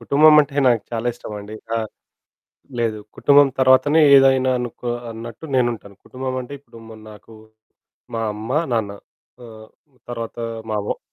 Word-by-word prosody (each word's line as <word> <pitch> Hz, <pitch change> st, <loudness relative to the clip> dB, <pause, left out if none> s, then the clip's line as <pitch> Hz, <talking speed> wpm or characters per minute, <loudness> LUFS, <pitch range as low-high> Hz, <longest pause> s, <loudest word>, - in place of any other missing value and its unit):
కుటుంబమంటే 150 Hz, +3 st, +5 dB
నాకు 120 Hz, -4 st, +2 dB
చాలా 115 Hz, +1 st, -3 dB
ఇష్టమండి. 105 Hz, -2 st, -9 dB, 0.2 s
ఆ! -, -, +1 dB, 1.0 s
లేదు. 110 Hz, -2 st, -1 dB, 0.2 s
కుటుంబం 145 Hz, 0 st, +5 dB
తర్వాతనే 130 Hz, +4 st, +4 dB
ఏదైనా 135 Hz, -1 st, +4 dB
అనుకో 120 Hz, 0 st, -5 dB, 0.2 s
అన్నట్టు 115 Hz, +5 st, -9 dB
నేనుంటాను. 120 Hz, -5 st, -1 dB
కుటుంబమంటే 130 Hz, 0 st, -5 dB
ఇప్పుడు 135 Hz, -4 st, -17 dB
ము 110 Hz, -, -11 dB
నాకు 105 Hz, +1 st, -15 dB, 0.8 s
మా 115 Hz, -, -2 dB
అమ్మ, 110 Hz, +2 st, -8 dB, 0.2 s
నాన్న 110 Hz, -3 st, -1 dB, 0.5 s
ఆహ్, 110 Hz, -1 st, -13 dB, 0.4 s
తర్వాత 115 Hz, -1 st, -6 dB, 0.3 s
మా 105 Hz, -, 0 dB
వ -, -, -3 dB
120 Hz, 125 wpm, -20 LUFS, 110-130 Hz, 1.0 s, కుటుంబమంటే